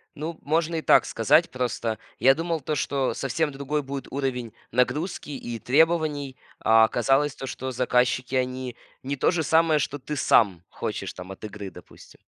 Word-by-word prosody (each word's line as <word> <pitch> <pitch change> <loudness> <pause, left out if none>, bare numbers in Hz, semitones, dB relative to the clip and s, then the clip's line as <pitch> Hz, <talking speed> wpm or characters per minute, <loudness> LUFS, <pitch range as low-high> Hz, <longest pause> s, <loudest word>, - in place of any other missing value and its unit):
Ну, 160 +2 -5
можно 165 +3 0
и 160 - -1
так - - +5
сказать. 135 - +3
Просто 120 -3 -2 0.2
я 135 - +6
думал 165 -1 -2
то, 150 +3 -2
что 140 -1 0
совсем 145 +3 -1
другой 140 +2 -2
будет 135 -1 -6
уровень 125 -5 -3 0.2
нагрузки 130 - 0
и 120 -4 -5
требований. 150 -1 +2 0.2
А 110 0 +5
оказалось 135 +5 +2
то, 135 - -6
что 130 0 -5
заказчики, 125 +1 +1
они 130 -1 -2 0.3
не 140 +2 -2
то 135 - +2
же 165 -3 0
самое, 160 0 +3
что 145 +1 -2
ты 150 +3 -5
сам 100 -10 +3
хочешь - - -4
там 90 +1 -9
от 95 - -11
игры, 105 -2 -6
допустим. - - -15
135 Hz, 170 wpm, -25 LUFS, 125-150 Hz, 0.3 s, я